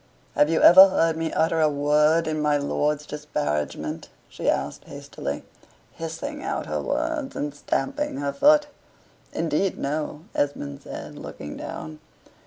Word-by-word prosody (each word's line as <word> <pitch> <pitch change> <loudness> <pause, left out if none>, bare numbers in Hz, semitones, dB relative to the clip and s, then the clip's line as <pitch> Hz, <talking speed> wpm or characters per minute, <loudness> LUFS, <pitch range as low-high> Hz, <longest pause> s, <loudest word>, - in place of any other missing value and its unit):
"Have 145 - +3
you 165 - +2
ever 190 +2 +10
heard 165 -3 +2
me 160 0 -2
utter 160 0 +1
a 155 - +4
word 150 +3 +3
in 155 -1 -2
my 150 -1 +2
lord's 150 +1 -1
disparagement?" 75 - -3 0.2
she - - -2
asked 70 +1 -2
hastily, - - -6 0.5
hissing 160 0 -6
out - - -3
her - - -2
words, 305 -4 -2
and 145 0 -3
stamping 275 - -2
her 140 0 -2
foot. 295 +1 +5 0.7
"Indeed, 165 +4 0
no," 150 +1 -3
Esmond 105 - -2
said, - - -8
looking 75 - -8
down. 80 0 -7
150 Hz, 140 wpm, -24 LUFS, 145-165 Hz, 0.7 s, ever